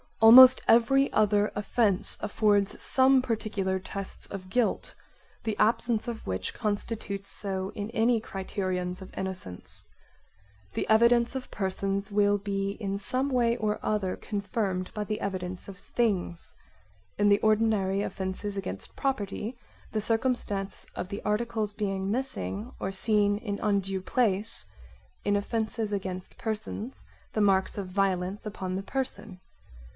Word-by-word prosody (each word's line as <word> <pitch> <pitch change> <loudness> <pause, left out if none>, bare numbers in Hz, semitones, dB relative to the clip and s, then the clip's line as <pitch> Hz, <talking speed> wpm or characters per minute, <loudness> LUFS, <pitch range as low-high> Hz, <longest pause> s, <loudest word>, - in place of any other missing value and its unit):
Almost 255 +3 +10
every 270 +4 +4
other 210 -1 +3
offence 205 -1 +3
affords 205 -1 +1
some 265 0 +4
particular 210 -5 -1
tests 195 +1 -5
of 185 -2 -8
guilt, 240 +2 0 0.5
the 215 -2 -2
absence 230 0 +1
of' 235 -2 -5
which 95 0 -3
constitutes 205 -2 -3
so 190 -1 -3
in 205 +1 -4
any 230 0 +2
criterions 185 -3 -3
of 190 - -11
innocence. 185 - -5 0.9
The - - -2
evidence 235 +3 +4
of 260 -1 -5
persons 195 0 -2
will 205 0 +3
be 195 0 -2
in 200 -2 -2
some 255 +7 +3
way 240 -2 +2
or 215 -2 -1
other 205 -4 0
confirmed 200 -2 -3
by 210 - -1
the 215 +1 -4
evidence 185 -2 -4
of 195 -2 -9
things: 195 -7 -2 0.7
in 205 0 +4
the 200 0 +5
ordinary 215 -3 +2
offences 195 +2 -3
against 195 -1 -5
property 235 -3 -2 0.3
the 215 - -1
circumstance 225 -4 -1
of 180 - -4
the 200 0 -5
articles 215 0 -1
being 195 -2 -2
missing 250 -1 -3
or 190 - -2
seen 205 +1 +2
in 205 -2 -4
undue 195 -2 0
place, 215 0 +1 0.6
in 205 - +1
offences 220 +1 -1
against 185 -2 -5
persons 220 +2 -5 0.3
the 215 - +1
marks 195 -1 +2
of 200 -2 -3
violence 190 +1 -1
upon 185 -3 -4
the 195 - -3
person. 235 -5 -5
205 Hz, 135 wpm, -28 LUFS, 195-225 Hz, 0.9 s, Almost